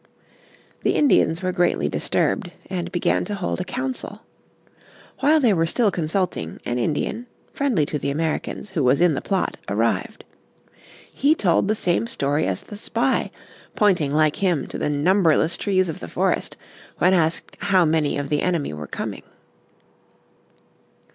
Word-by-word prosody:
The - - +1
Indians 195 - +3
were 185 - 0
greatly 180 -1 +1
disturbed, 195 -7 -1 0.2
and 175 -2 -3
began 175 -2 +1
to 205 - -4
hold 185 -1 -2
a - - -1
council. 255 +6 -4 1.0
While 305 +3 +4
they 240 -7 +4
were 165 -2 +1
still 215 +3 +2
consulting, 165 - -2
an 120 +1 -1
Indian, 160 - -2 0.3
friendly 245 - +1
to 150 - -3
the 140 - -2
Americans, 160 +6 -3
who 165 -7 0
was 125 +2 +3
in 175 -2 +4
the 135 - -2
plot, 195 -2 -1
arrived. - - -1 0.9
He 295 +3 +3
told 185 - +2
the 215 - +1
same 185 +3 0
story 145 -8 0
as 95 -1 -2
the 205 - -10
spy, - - 0 0.5
pointing 180 -9 +2
like 155 0 +2
him 175 -8 +1
to - - -5
the - - 0
numberless 160 +1 +2
trees 185 -2 +1
of 160 - -5
the 85 - -7
forest - - -1 0.4
when 185 +2 +4
asked 165 -2 0
how 185 -3 +3
many 155 -2 +1
of 140 -1 -3
the 150 - +1
enemy 170 - -1
were 75 -1 -7
coming. - - -5
175 Hz, 155 wpm, -22 LUFS, 150-200 Hz, 1.0 s, While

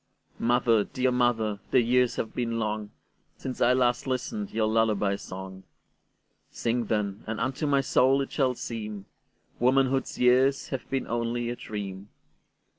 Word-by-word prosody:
Mother, 120 -2 +3
dear 130 +4 0
mother, 115 -4 +1
the 130 - +4
years 125 +1 +2
have 110 - -3
been 120 -2 -2
longSince 110 +4 -6
I 120 +1 +5
last 125 0 +1
listened 200 - -2
your 110 -1 0
lullaby 110 -2 +2
song:Sing, 95 +5 -7
then, 105 -2 -1
and 110 0 -3
unto 135 +4 -1
my 140 -1 +3
soul 135 +1 +3
it 135 - -4
shall 130 -3 +1
seemWomanhood's 120 +5 -2
years 130 +2 +3
have 130 -4 -5
been 135 -1 -1
only 120 0 -2
a - - -4
dream. 100 -3 -6
120 Hz, 130 wpm, -27 LUFS, 110-130 Hz, -, I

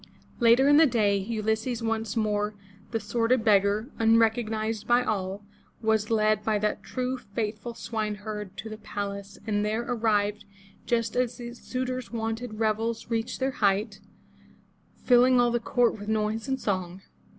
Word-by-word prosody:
Later 240 +3 +5
in 290 0 +6
the 320 0 +7
day, 215 -5 +2
Ulysses, 220 +3 -1
once 225 -1 -2
more 210 -1 0 0.3
the 225 - -1
sordid 235 +1 +1
beggar, 205 +4 +3
un 225 0 +5
recognized 220 -1 0
by 240 +1 +4
all, 200 -3 -2 0.4
was 220 -1 +1
led 215 -1 +2
by 220 -1 +1
that 210 +1 -1
true, 255 0 -3
faithful 215 +1 -4
swineherd 210 -3 -4
to 220 - -6
the 215 0 -8
palace, 200 -1 -5
and 205 -2 0
there 215 +2 -1
arrived 210 -4 0 0.4
just 230 -1 0
as 245 -1 0
the 240 -1 -7
suitors' 255 0 -4
wonted 225 0 -3
revels 225 +1 -1
reached 225 0 -2
their 265 0 0
height, 200 0 +1 1.0
filling 250 0 +4
all 240 0 +4
the 240 - +1
court 235 -1 +1
with 205 - -8
noise 220 +2 -1
and 265 0 -1
song. 185 -3 -3
220 Hz, 150 wpm, -27 LUFS, 210-240 Hz, 1.0 s, the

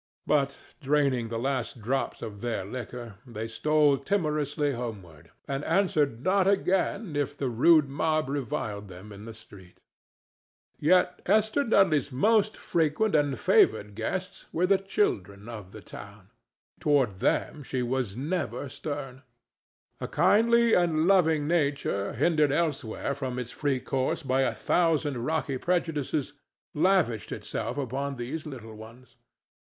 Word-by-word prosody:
But, 140 -2 +1 0.2
draining 135 -5 +1
the 115 - -3
last 130 -1 -2
drops 130 +5 -2
of 105 -3 -7
their 120 -5 -2
liquor, 120 -1 -7
they 115 -3 -6
stole 150 +3 +2
timorously 150 -3 0
homeward, 105 - -7 0.2
and 140 +1 -3
answered 155 - +1
not 190 +1 +3
again 195 -2 +1
if 145 0 -2
the 135 -2 -1
rude 145 +6 +5
mob 155 +2 0
reviled 110 -7 -3
them 95 +3 -11
in 100 +1 -10
the 115 - -8
street. 100 -5 -16 1.0
Yet 180 +4 +3
Esther 220 +6 +3
Dudley's 175 - +3
most 215 - +2
frequent 165 +6 0
and 145 -3 +2
favored 370 - +3
guests 180 - -4
were 175 +3 +1
the 195 +1 +3
children 105 - -1
of 105 -5 -8
the - - -10
town. - - -12 0.5
Toward 135 -10 +2
them 150 - 0
she 130 -2 -3
was 120 -4 -2
never 150 0 -3
stern. 135 -2 -6 0.8
A - - -4
kindly 235 +2 +4
and 165 -3 +3
loving 160 -6 +3
nature 140 -11 0
hindered 150 +2 +2
elsewhere 145 -5 -1
from 130 -2 -4
its 125 -1 -5
free 140 -3 -1
course 135 +6 -2
by 135 0 +1
a 135 - 0
thousand 150 -7 +1
rocky 155 -4 -1
prejudices 155 -5 -1 0.4
lavished 150 - +1
itself - - -4
upon 140 +1 -3
these 140 +6 -5
little 115 -6 -8
ones. 115 +3 -14
140 Hz, 135 wpm, -27 LUFS, 120-160 Hz, 1.0 s, rude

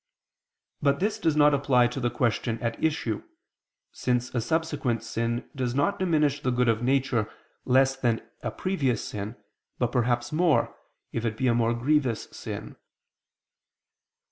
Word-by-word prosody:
But 140 -1 +2
this 205 +3 0
does 160 -2 +1
not 150 -1 +5
apply 135 -3 +4
to 120 +2 -2
the 120 -1 +1
question 120 -1 0
at 115 -1 -3
issue, 120 -9 0 0.7
since 125 0 -1
a 120 - 0
subsequent 140 -4 -1
sin 115 +1 -2
does 125 -2 -2
not 145 +8 +1
diminish 155 -6 +2
the - - 0
good 125 0 +2
of 115 0 +2
nature 125 -4 +1 0.3
less 135 +1 +4
than 120 -4 -1
a - - -2
previous 140 - -1
sin, 105 +2 -5 0.4
but 120 -1 0
perhaps 120 -1 +1
more, 160 0 +2 0.4
if 115 - -3
it 110 -2 -2
be 130 - -1
a 120 - +4
more 115 0 +2
grievous 130 -1 +1
sin. - - -7
125 Hz, 150 wpm, -27 LUFS, 115-145 Hz, 0.7 s, not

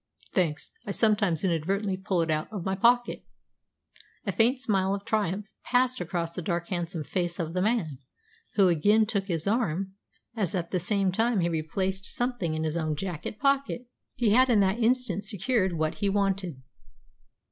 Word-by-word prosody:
"Thanks. 165 -6 0
I - - -8
sometimes 200 -5 +2
inadvertently 190 +3 0
pull 190 -2 0
it 160 - -1
out 155 +5 -1
of 200 -5 -5
my 190 - 0
pocket." 240 +5 +2 1.0
A - - 0
faint 245 +4 +2
smile 195 -5 +1
of 200 0 -8
triumph 210 -3 0 0.2
passed 255 0 +2
across 170 -1 -2
the 180 - -4
dark, 170 0 -2
handsome 175 -3 -3
face 175 +2 -2
of 165 -3 -3
the 180 - 0
man, 190 - 0 0.6
who 200 -2 +5
again 205 +6 +4
took 200 -3 -2
his 165 -4 -1
arm, 195 -4 0 0.4
as 200 -7 -1
at 170 -2 -3
the 185 - +1
same 195 +1 +1
time 225 +1 +1
he 170 - +1
replaced 190 +4 -2
something 240 -10 -2
in 155 - -2
his 160 +1 -1
own 155 -2 -1
jacket 180 +3 -5
pocket. 275 -2 +1 0.3
He 235 -4 +2
had 255 +4 +5
in 225 -4 +5
that 195 +4 +2
instant 235 -5 +1
secured 200 -1 0
what 155 -1 0
he 200 - -1
wanted. 195 -8 -1
195 Hz, 175 wpm, -28 LUFS, 170-220 Hz, 1.0 s, who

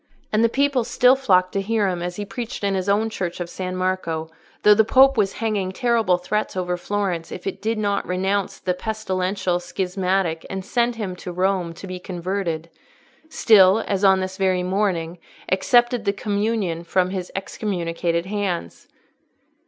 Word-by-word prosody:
And 215 +2 +3
the 230 - +4
people 275 0 +1
still 250 +3 +4
flocked 185 -9 +2
to 195 - -1
hear 210 0 +1
him 180 -2 -2
as 175 0 -4
he 205 - -4
preached 230 +3 -6
in 200 -1 +1
his 190 0 -1
own 210 +2 +2
church 180 -5 -4
of 175 -1 -5
San 185 -1 -4
Marco, 175 -4 -2 0.3
though 210 - +8
the 220 +1 +5
Pope 265 +4 +5
was 200 -4 +1
hanging 210 -4 -1
terrible 225 -4 +2
threats 210 +2 -2
over 180 -1 -1
Florence 180 -3 -2
if 180 - -8
it 195 - -4
did 225 +2 -1
not 205 -2 -1
renounce 190 +2 -1
the 180 - -1
pestilential 190 -3 -2
schismatic 185 -2 -1
and 190 -1 -5
send 240 +2 +1
him 200 -5 -4
to 180 - -7
Rome 185 -1 0
to - - -9
be 185 -1 -6
"converted"—still, 185 - +1
as 195 0 -1
on 190 -1 +5
this 185 0 -4
very 185 -2 +1
morning, 180 -3 -1 0.3
accepted 240 +5 +3
the 200 - +2
Communion 205 -4 -1
from 185 +1 +1
his 185 -2 -4
excommunicated 170 -4 -2
hands. 190 - -3
190 Hz, 170 wpm, -22 LUFS, 180-210 Hz, 0.3 s, though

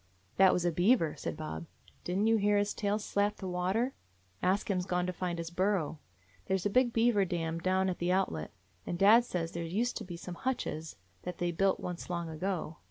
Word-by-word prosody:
"That 190 -1 +7
was 175 - 0
a 175 - +3
beaver," 175 0 +3
said - - -5
Bob. 80 +1 -5 0.4
"Didn't 190 +4 +1
you 225 0 +4
hear 205 0 +3
his 205 0 +1
tail 205 -1 0
slap 205 -1 0
the 190 - -5
water? 190 +8 0 0.5
Ask 190 +3 +1
Him 185 -2 +1
's 180 - -7
gone 180 -1 +1
to 180 - -2
find 175 -1 -3
his 165 0 -5
burrow. 180 -4 0 0.5
There 190 - +2
's 185 - -7
a 205 - +1
big 250 +2 +4
beaver 225 -3 +3
dam 165 -2 -2
down 185 +2 +1
at 185 - -2
the 175 +1 +1
outlet, 180 - 0 0.3
and 175 - -3
dad 220 +6 +7
says 170 -7 -3
there 170 - -4
used 210 +9 -1
to - - -5
be 175 -2 -7
some 180 +1 -7
hutches 165 -11 -2 0.3
that 180 -1 -6
they 175 0 0
built 190 +3 +2
once 180 -1 -5
long 170 -2 -2
ago. 160 -1 -3
185 Hz, 220 wpm, -31 LUFS, 170-205 Hz, 0.5 s, That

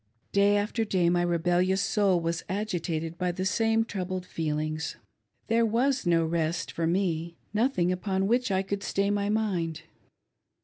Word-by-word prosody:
Day 200 +1 +4
after 210 +3 0
day 185 -5 +2
my 175 0 +2
rebellious 175 +2 +2
soul 195 -4 +2
was 165 0 -2
agitated 170 -5 -2
by 180 -1 +1
the 185 +2 -3
same 225 +3 +2
troubled 185 -3 -4
feelings. 155 -1 -2 0.5
There 230 +1 +2
was 245 +1 +1
no 165 -1 +3
rest 165 +1 -1
for 165 -1 -1
me 170 -2 -1
— - - -40
nothing 215 -6 +2
upon 190 +1 -1
which 240 +3 +1
I 190 -1 +1
could 200 +1 -3
stay 200 0 0
my 205 0 0
mind. 175 -7 -1
185 Hz, 160 wpm, -28 LUFS, 170-205 Hz, 0.5 s, Day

